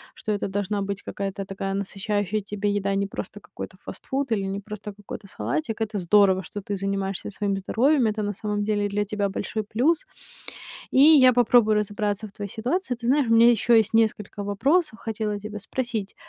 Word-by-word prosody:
что 215 - -4
это 205 - -1
должна 200 +1 -2
быть 200 0 -3
какая-то 195 0 -4
такая 195 0 -4
насыщающая 205 +1 -1
тебя 205 +1 -2
еда, 200 -1 0
не 200 - +1
просто - - -7
какой-то - - -9
фастфуд 270 -2 -4
или 200 -3 +1
не 195 +1 -3
просто 210 0 -7
какой-то 205 0 -9
салатик. 225 +1 -3
Это 215 -1 -1
здорово, 190 +1 +4
что 205 - -7
ты 200 +1 -4
занимаешься 195 0 -2
своим 200 -1 -1
здоровьем, 245 +6 +2
это 215 0 -1
на 205 - -1
самом 210 +1 -2
деле 205 -1 0
для 205 +1 0
тебя 205 -1 -1
большой 215 +2 -3
плюс. 255 +11 +1 0.9
И - - +3
я 280 -4 +8
попробую 235 -2 +4
разобраться 210 0 -1
в 200 - -16
твоей 200 -1 -6
ситуации. 255 +4 -1
Ты 235 0 -6
знаешь, 280 0 +3
у - - +4
меня 230 +1 +7
ещё 235 +1 +2
есть 220 -1 +3
несколько 210 -2 +1
вопросов, 265 - +1
хотела 215 -2 -3
тебя 210 0 -7
спросить. 225 -3 -4
210 Hz, 190 wpm, -25 LUFS, 200-225 Hz, 0.9 s, я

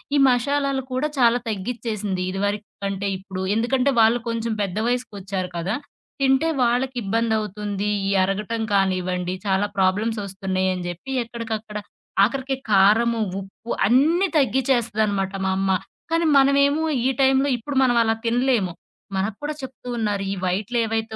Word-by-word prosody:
ఈ - - +4
మషాలాలు 275 +2 +1
కూడా 260 +4 0
చాలా 240 0 +5
తగ్గిచ్చేసింది. 215 -2 -3
ఇదివరకి 205 +2 -2 0.2
కంటే 195 0 -2
ఇప్పుడు. 190 -1 -7
ఎందుకంటే, 255 +4 +2
వాళ్ళు 225 +2 +4
కొంచెం 230 0 -2
పెద్ద 195 -1 -2
వయసుకొచ్చారు 200 -6 -3
కదా! 180 +6 -1 0.5
తింటే 270 +4 +3
వాళ్ళకిబ్బందివుతుంది. 220 -4 -1 0.2
ఈ - - +1
అరగటం 210 +4 -2
కానివ్వండి, 185 -2 0
చాలా 195 +1 +1
ప్రాబ్లమ్స్ 205 +4 +1
ఒస్తున్నాయని 190 -1 -2
జెప్పి, 175 +10 -6
ఎక్కడికక్కడ 225 -2 -5 0.5
ఆఖరికి 265 +4 0 0.2
కారము, 220 +4 +4 0.2
ఉప్పు 195 +4 -13 0.2
అన్నీ 310 - +4
తగ్గిచ్చేస్తదనమాట 230 -7 +1
మా 190 - +1
అమ్మ. 195 0 0 0.4
కానీ 330 +1 +1
మనమేమో 280 +3 +4 0.2
ఈ - - +4
టైంలో 270 +1 +4
ఇప్పుడు 275 +5 -6
మనం 245 -2 +3
అలా 225 -1 +2
తినలేము. 235 -6 +1 0.4
మనకు 195 +2 -1
కూడా 300 +1 -2
చెప్తూ 260 -1 -9
ఉన్నారు. 205 -3 -1
ఈ - - -4
వైట్‌లేవైతే 220 +3 -1
220 Hz, 130 wpm, -23 LUFS, 195-250 Hz, 0.5 s, చాలా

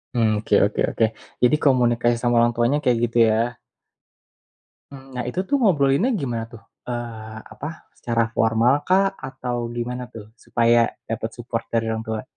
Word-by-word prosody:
Mhm, 115 -2 +3
oke 105 - -4
oke 105 - -2
oke. 115 - +2 0.4
Jadi 125 +5 +5
komunikasi 120 -3 +3
sama 120 -1 +1
orang 120 0 +3
tuanya 120 +5 +2
kayak 125 -2 +3
gitu 120 +1 -4
ya. 115 +2 0 1.3
Mhm, 135 -1 -12
nah, 125 - -2
itu 180 - -4
tuh 285 - +2
ngobrolinnya 160 - +3
gimana 120 -4 -2
tuh? 110 -3 -13 0.3
Eee, 110 -2 -6
apa? 155 +4 -8
Secara 115 -1 0
formal 115 +6 +3
kah? 195 +1 +3
Atau 125 -3 -5
gimana 125 +1 -4
tuh 105 -2 -10
supaya 115 0 +2 0.2
dapet 110 0 -3
support 120 -1 -4
dari 115 -1 0
orang 110 0 -2
tua? 110 0 -4
120 Hz, 160 wpm, -22 LUFS, 115-130 Hz, 1.3 s, Jadi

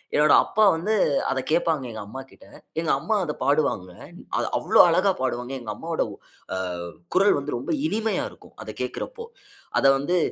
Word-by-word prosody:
என்னோட 150 +1 +5
அப்பா 220 - +1
வந்து, 195 +7 -1 0.4
அத 135 - 0
கேட்பாங்க, 160 -4 +1
எங்க 110 - -7
அம்மாகிட்ட. 135 +4 -11 0.3
எங்க 165 - -2
அம்மா, 175 +9 -1
அத 150 - -3
பாடுவாங்க. 140 -10 +1 0.2
அ - - -12 0.3
அது - - -1
அவ்ளோ - - +5
அழகா 185 +4 +3
பாடுவாங்க. 125 0 -2
எங்க 110 -2 -5
அம்மாவோட 165 0 -2 0.5
அ - - -2 0.6
குரல் 195 -3 +5
வந்து, 140 -2 -4
ரொம்ப 120 - -4 0.2
இனிமையா 220 -2 -1
இருக்கும். - - -18
அத - - -10
கேட்கிறப்போ. 465 -2 -5 0.5
அத - - 0
வந்து 175 +6 0
155 Hz, 165 wpm, -24 LUFS, 135-185 Hz, 0.6 s, என்னோட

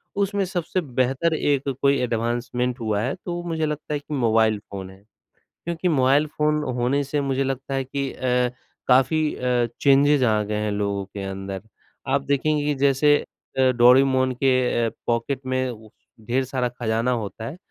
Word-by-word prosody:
उसमें 200 0 0
सबसे 180 0 -2 0.2
बेहतर 135 +6 +2
एक 140 -2 0
कोई 140 0 +4
एडवांसमेंट 120 +1 -1
हुआ 110 -3 -1
है, 125 +5 -1
तो 175 -1 -3
मुझे 160 -1 -1
लगता 150 0 -4
है 145 - -1
कि 150 +1 -8
मोबाइल 110 -4 +2
फ़ोन 95 -2 -8
है। 95 - -15 0.7
क्योंकि 170 +1 -1
मोबाइल 140 -1 +3
फ़ोन 150 0 0
होने 125 +4 +1
से 145 +2 -1
मुझे 135 -1 0
लगता 135 +1 -3
है 135 -1 -1
कि 140 +1 -3
अ, 125 -1 +1 0.4
काफ़ी 150 +4 +3
अ, 125 -1 +1
चेंजेस 140 0 +4
आ 110 -3 +3
गए 105 0 -3
हैं 105 - -1
लोगों 100 -1 -1
के 100 +1 -8
अंदर। 95 0 -6 0.5
आप 140 +1 +2
देखेंगे 145 +1 +1
कि 150 0 +1
जैसे 145 +2 +4 0.4
अ, 130 -1 +5
डोरेमॉन 130 +1 +5
के 130 -3 +2 0.2
पॉकेट 120 +3 -1
में 130 -4 -3 0.4
ढेर 130 +3 +1
सारा 130 -1 -1
ख़ज़ाना 120 0 -1
होता 110 -1 -4
है 155 - -6
130 Hz, 165 wpm, -23 LUFS, 120-145 Hz, 0.7 s, अ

